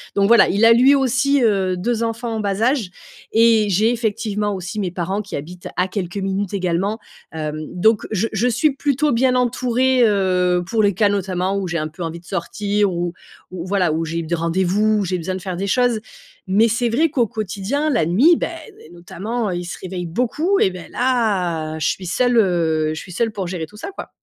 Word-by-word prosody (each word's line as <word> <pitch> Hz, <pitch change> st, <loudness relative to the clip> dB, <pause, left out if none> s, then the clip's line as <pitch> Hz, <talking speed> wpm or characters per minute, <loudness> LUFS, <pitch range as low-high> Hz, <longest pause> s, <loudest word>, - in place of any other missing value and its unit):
Donc 200 Hz, 0 st, +3 dB
voilà, 235 Hz, -2 st, +6 dB
il 205 Hz, +4 st, +3 dB
a 230 Hz, -, +8 dB
lui 260 Hz, +4 st, +5 dB
aussi, 270 Hz, +1 st, +2 dB
heu, 195 Hz, -4 st, +2 dB
2 230 Hz, +4 st, -1 dB
enfants 230 Hz, 0 st, -3 dB
en -, -, -2 dB
bas 200 Hz, 0 st, -2 dB
âge 240 Hz, -6 st, +1 dB, 0.4 s
et 225 Hz, -2 st, +4 dB
j'ai 210 Hz, +4 st, +3 dB
effectivement 210 Hz, -3 st, -1 dB
aussi 185 Hz, +3 st, -5 dB
mes 180 Hz, -, -2 dB
parents 185 Hz, +4 st, -2 dB
qui 200 Hz, -, -7 dB
habitent 175 Hz, +5 st, -8 dB
à 180 Hz, +1 st, +2 dB
quelques 185 Hz, -1 st, -4 dB
minutes 195 Hz, 0 st, -2 dB
également. 190 Hz, +3 st, -1 dB, 0.3 s
Hem, 155 Hz, -1 st, -4 dB
donc 215 Hz, +4 st, +2 dB
je 215 Hz, +2 st, 0 dB
je 220 Hz, +4 st, +1 dB
suis 280 Hz, +6 st, +2 dB
plutôt 290 Hz, +1 st, +1 dB
bien 255 Hz, +2 st, +2 dB
entourée, 250 Hz, +1 st, +2 dB
heu, 180 Hz, -3 st, +2 dB
pour 220 Hz, 0 st, +1 dB
les 200 Hz, -1 st, +3 dB
cas 210 Hz, +3 st, +3 dB
notamment 190 Hz, -1 st, -1 dB
où 190 Hz, -2 st, -2 dB
j'ai 175 Hz, -, -1 dB
un 155 Hz, 0 st, -2 dB
peu 155 Hz, +3 st, -8 dB
envie 165 Hz, +1 st, -5 dB
de 170 Hz, -, -23 dB
sortir 200 Hz, +3 st, -1 dB
ou 175 Hz, 0 st, -2 dB, 0.4 s
ou 180 Hz, -1 st, -6 dB
voilà, 185 Hz, -5 st, +1 dB
ou 165 Hz, -, -1 dB
j'ai 165 Hz, +1 st, -3 dB
des 170 Hz, +2 st, -1 dB
rendez-vous 190 Hz, +6 st, +1 dB
ou 200 Hz, -, -1 dB
j'ai 180 Hz, 0 st, -1 dB
besoin 185 Hz, +2 st, -4 dB
de 185 Hz, -, -6 dB
faire 185 Hz, 0 st, -4 dB
des 200 Hz, +1 st, -2 dB
choses. 245 Hz, +1 st, +2 dB, 0.5 s
Mais 210 Hz, +5 st, +4 dB
c'est 235 Hz, +1 st, 0 dB
vrai 305 Hz, +8 st, +2 dB
qu'au 245 Hz, -6 st, +1 dB
quotidien, 215 Hz, +7 st, -2 dB
la 240 Hz, -, +2 dB
nuit, 255 Hz, -, +5 dB
bah, -, -, -2 dB, 0.4 s
notamment, 205 Hz, +6 st, -4 dB
ils 175 Hz, 0 st, -3 dB
se 180 Hz, -, -6 dB
réveillent 180 Hz, -1 st, -5 dB
beaucoup 295 Hz, -, 0 dB
et -, -, +4 dB
beh 180 Hz, -2 st, -9 dB
là, 180 Hz, -11 st, 0 dB
je 155 Hz, -, 0 dB
suis 185 Hz, -, -2 dB
seule, 245 Hz, +8 st, +1 dB
heu, 165 Hz, -6 st, +2 dB
je 155 Hz, -, -5 dB
suis 180 Hz, -, -10 dB
seule 225 Hz, +3 st, 0 dB
pour 195 Hz, -3 st, -4 dB
gérer 175 Hz, -3 st, -4 dB
tout 210 Hz, -, -16 dB
ça, 305 Hz, -, -6 dB
quoi. 390 Hz, -, -8 dB
200 Hz, 215 wpm, -20 LUFS, 180-230 Hz, 0.5 s, a